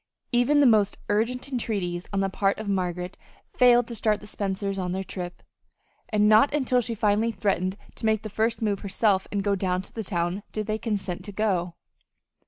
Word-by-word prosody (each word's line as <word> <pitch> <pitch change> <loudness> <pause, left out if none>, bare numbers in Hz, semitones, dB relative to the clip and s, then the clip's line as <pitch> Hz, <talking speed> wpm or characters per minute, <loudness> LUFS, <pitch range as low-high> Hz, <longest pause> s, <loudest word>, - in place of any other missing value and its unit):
Even 245 +4 +4
the - - +6
most 215 -5 +4
urgent 240 +6 0
entreaties 195 -8 -2
on 200 -1 0
the 195 - +1
part 195 +1 +1
of 220 - -6
Margaret 180 -2 -2 0.4
failed 245 -1 +6
to 235 - -6
start 215 -1 +1
the - - -12
Spencers 195 -1 -3
on 180 -1 -2
their 190 +1 -2
trip, 180 -1 -7 0.7
and 210 -1 +3
not 215 +6 +6
until 255 -3 +2
she 230 0 -3
finally 215 +2 +2
threatened 190 -2 -1 0.2
to 225 - -2
make 220 0 +1
the - - -4
first 225 +2 -1
move 205 -2 0
herself 200 -1 +1
and 200 -1 -1
go 200 0 +1
down 185 -1 0
to - - -13
the 225 - -4
town, 175 0 -1
did 215 -1 -2
they 215 +1 -2
consent 195 -6 -3
to 205 - -7
go. 185 -5 -1
205 Hz, 195 wpm, -26 LUFS, 190-220 Hz, 0.7 s, the